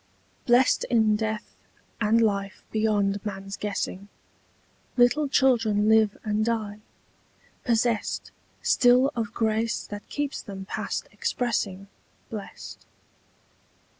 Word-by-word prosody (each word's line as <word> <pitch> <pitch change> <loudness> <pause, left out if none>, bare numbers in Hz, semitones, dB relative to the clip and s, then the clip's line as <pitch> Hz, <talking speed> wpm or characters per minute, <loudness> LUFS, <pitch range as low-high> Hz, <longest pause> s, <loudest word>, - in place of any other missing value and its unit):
BLEST 245 +2 +4
in 220 -3 +3
death 220 +1 -3 0.5
and 220 +2 +4
life 200 -3 0
beyond 205 -2 +1
man's 195 -1 -5
guessing 200 -1 -4 0.9
Little 250 +5 +4
children 230 -7 +3
live 220 -1 +4
and 215 -1 0
die, 215 -2 -2 0.8
possest 230 -2 0 0.3
Still 250 +3 +4
of 225 -3 -2
grace 225 0 0
that 205 0 -9
keeps 290 -1 -3
them 195 -1 -8
past - - -4
expressing 200 -5 -2 0.4
Blest. 210 -3 -8
220 Hz, 100 wpm, -26 LUFS, 205-235 Hz, 0.9 s, BLEST